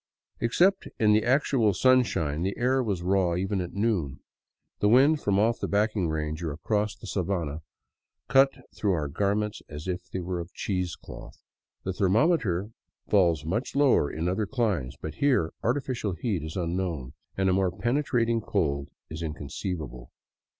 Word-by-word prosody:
Except 180 +12 +2
in 105 -1 +4
the 110 0 +3
actual 125 -5 +2
sunshine, 105 - +2
the 95 +3 -2
air 130 +2 +2
was 100 -7 -2
raw 90 -2 +2
even 95 +2 -1
at 90 - -6
noon. 95 -11 0 0.6
The 105 - +3
wind 140 +6 +5
from 100 -1 +1
off 110 +3 +2
the - - -2
backing 105 -3 +1
range 80 0 -3
or 80 -3 -2
across 105 +8 -1
the - - -13
sabana 85 -6 -2 0.7
cut 135 +1 +6 0.2
through 100 -3 0
our 75 -4 -1
garments 100 +6 -1
as 75 +3 -7
if 90 -1 -4
they - - -4
were 90 0 -3
of 85 +1 -8
cheesecloth. 90 -3 -5 0.4
The 95 - -2
thermometer 105 - +2 0.4
falls 85 -7 +3
much 110 +13 -2
lower 140 - +4
in 80 +2 -3
other 95 +3 0
climes, 105 - -1
but 80 - -5
here 125 - +2
artificial 120 -5 -1
heat 90 0 -2
is 80 0 -6
unknown, 85 -7 -2 0.2
and 95 0 +2
a 95 - +3
more 95 0 +2
penetrating 120 +1 0
cold 70 -10 -1 0.2
is 80 +1 -6
inconceivable. 75 - -5
95 Hz, 155 wpm, -27 LUFS, 85-115 Hz, 0.7 s, cut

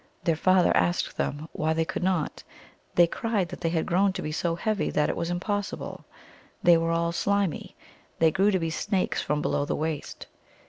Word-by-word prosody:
Their 165 - +2
father 185 +2 +3
asked 85 0 +1
them 145 +3 -3
why 155 +1 0
they 165 0 0
could - - -4
not. 180 -4 -1 0.5
They 175 - +7
cried 200 0 -1
that 180 - -8
they 165 - +1
had 165 -1 0
grown 190 +2 +2
to - - -5
be 155 - -3
so 165 +2 -1
heavy 215 +4 -1
that 150 - +1
it - - -1
was 170 0 -2
impossible. 200 +3 -3 0.6
They 175 - +7
were 165 0 +1
all 170 0 +1
slimy; 200 0 -1 0.4
they 160 -1 +4
grew 195 +3 +3
to 195 - +2
be 165 -2 -2
snakes 185 +4 -1
from 150 0 -1
below - - 0
the - - -2
waist. 155 -1 -4
170 Hz, 195 wpm, -27 LUFS, 160-190 Hz, 0.6 s, They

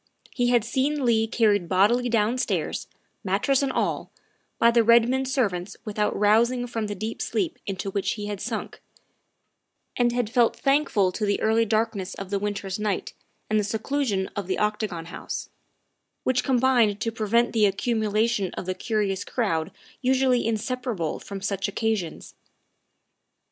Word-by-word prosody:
He 245 -2 +1
had 240 -2 +3
seen 270 +3 0
Leigh 225 -2 +3
carried 210 -6 +2
bodily 230 +7 +3
downstairs, 230 +2 0 0.4
mattress 205 +8 +1
and 275 -1 0
all, - - -1 0.5
by 235 - +5
the 235 0 +4
Redmond 235 +3 +4
servants 205 -8 -1
without 210 -1 -1
rousing 235 +4 +3
from 225 -3 -3
the 205 - -4
deep 215 +4 -5
sleep 350 -4 -2
into 195 0 -3
which 195 0 -1
he 210 -2 -5
had 205 -2 -5
sunk, 220 0 -5 1.1
and 240 -1 +2
had 245 -2 0
felt 235 +1 +2
thank 280 +2 +2
ful 195 -4 +2
to 215 - -4
the 205 -1 +1
early 225 +1 +2
darkness 215 -3 -1
of 195 0 -7
the 200 - +1
winter's 200 -1 -3
night 210 -2 -2 0.3
and 215 0 +2
the - - +1
seclusion 220 -2 -1
of 200 -4 -3
the 190 - -1
Octagon 210 -5 -1
House, 170 - -6 0.7
which 255 -1 +1
combined 245 -5 +3
to 225 +1 -1
pre 220 -1 -4
vent 235 +3 +3
the 215 -2 +4
accumulation 215 0 0
of - - -5
the 185 - -1
curious 200 -2 -1
crowd 170 -9 -1 0.3
usually 260 -2 +2
in 225 -1 +1
separable 230 - -3
from 200 -1 -7
such 195 0 -1
occasions. 200 -5 -2
220 Hz, 160 wpm, -25 LUFS, 200-240 Hz, 1.1 s, by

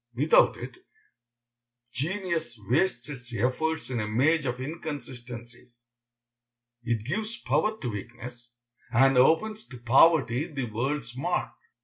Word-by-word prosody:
Without 145 +6 +4
it, - - -8 1.2
genius 165 - -2
wastes 125 - 0
its 125 -4 -8
efforts 130 +7 -1
in 120 - -1
a 105 - -2
maze 140 +7 +2
of 125 0 -2
inconsistencies. 125 -5 -8 0.9
It 115 -3 -2
gives 215 - -2
power 160 - +1
to 125 - -4
weakness, 120 +3 -8 0.4
and 135 +3 +5
opens 165 +12 +3
to 125 - -10
poverty 135 +3 +4
the 135 -4 -4
world's 120 +2 -3
mark. 175 +7 -1
130 Hz, 115 wpm, -27 LUFS, 120-160 Hz, 1.2 s, and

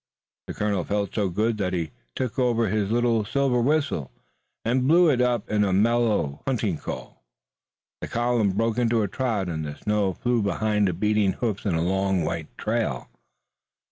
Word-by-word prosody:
The - - -6
colonel 105 -4 0
felt 100 0 -2
so 100 -3 0
good 110 +4 0
that 95 -2 -1
he 85 -4 -2 0.2
took 125 -1 -3
out 125 -2 +2
his 110 -3 0
little 115 -1 +2
silver 130 +2 +1
whistle, 140 - 0 0.6
and 125 +3 +1
blew 170 +1 +6
upon 125 -3 +2 0.2
it - - +5
a 100 - +1
mellow 105 -8 +1
hunting 110 - 0
call. - - -7 0.8
The - - -4
column 120 -3 +1
broke 115 +4 0
into 115 -2 +2
a - - 0
trot 110 -4 -1
and 80 -3 -3
the 75 -1 -5
snow 105 -1 0
flew 120 +4 0
behind 105 0 +1
the 90 - 0
beating 105 +1 +1
hoofs 110 -5 -3
in 90 - +1
a 80 - +1
long 95 0 +1
white 80 0 -3
trail. 110 - -2
105 Hz, 175 wpm, -25 LUFS, 95-120 Hz, 0.8 s, blew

